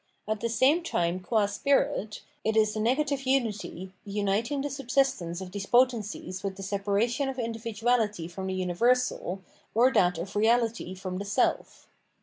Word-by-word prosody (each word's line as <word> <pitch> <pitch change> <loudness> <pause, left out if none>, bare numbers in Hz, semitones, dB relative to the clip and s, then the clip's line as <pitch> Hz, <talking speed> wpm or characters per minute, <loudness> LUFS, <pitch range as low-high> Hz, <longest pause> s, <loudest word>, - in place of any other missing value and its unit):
At 215 0 -1
the 230 - -1
same 260 +9 +3
time 175 - -1
qua 210 +3 +1
spirit, 210 -1 0 0.2
it 220 0 +1
is 215 -1 +3
the 215 - -3
negative 275 +5 +1
unity, 210 -8 -1
uniting 210 +6 -1
the 290 - -2
subsistence 255 -10 0
of 185 -1 -7
these 195 0 -5
potencies 220 -6 +1
with 195 -1 -3
the 195 - -8
separation 205 +7 0
of 265 - -5
individuality 225 -4 -1
from 190 +2 -6
the 190 - -2
universal, 190 +1 +1 0.3
or 245 +3 +5
that 180 -1 +3
of 185 +4 -5
reahty 225 -3 +1
from 185 -1 -5
the 200 - -4
self. 205 - -1
215 Hz, 155 wpm, -28 LUFS, 190-245 Hz, 0.3 s, or